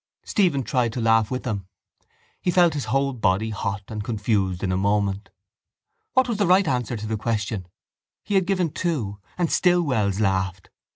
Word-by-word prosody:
Stephen 170 -10 +2
tried 125 -3 0
to 125 - -3
laugh 115 -1 +3
with 130 0 -3
them. 100 -7 -3 0.7
He - - 0
felt 175 -2 +4
his 145 -5 -3
whole 135 +4 +1
body 110 -1 +1
hot 100 0 -3
and 105 -1 -4
confused 100 -5 -1
in 95 - 0
a - - +1
moment. 100 +1 0 0.8
What 260 -1 +4
was 230 -3 -1
the 200 - +3
right 185 0 +5
answer 125 -3 -1
to 105 - -6
the 110 0 -2
question? 105 -4 -2 0.6
He 205 - -4
had 190 -2 +3
given 185 -5 +1
two 125 - -2 0.2
and 175 -2 0
still 180 -1 +3
Wells 105 - 0
laughed. 95 -2 -1
115 Hz, 180 wpm, -24 LUFS, 100-160 Hz, 0.8 s, right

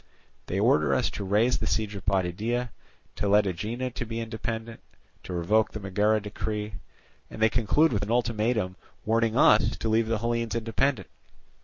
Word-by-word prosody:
They - - -1
order - - +3
us - - 0
to - - -5
raise 105 +6 +2
the - - -2
siege 110 -2 -1
of 100 -2 -8
Potidæa, 105 +6 0 0.5
to 105 - -1
let 105 +1 +5
Aegina 110 +8 -3
be 115 -1 -5
independent, 115 0 -5 0.4
to - - -9
revoke 105 +6 +1
the 110 - -5
Megara 105 +2 +1
decree; 105 0 -4 0.6
and - - -10
they 110 0 +4
conclude 125 +7 +2
with 100 - 0
an 100 - -4
ultimatum 115 -4 0 0.3
warning 115 0 +1
us - - +5
to 110 - -2
leave 110 +1 +2
the 115 0 0
Hellenes 115 0 -1
independent. 115 +4 0
110 Hz, 165 wpm, -27 LUFS, 105-115 Hz, 0.6 s, let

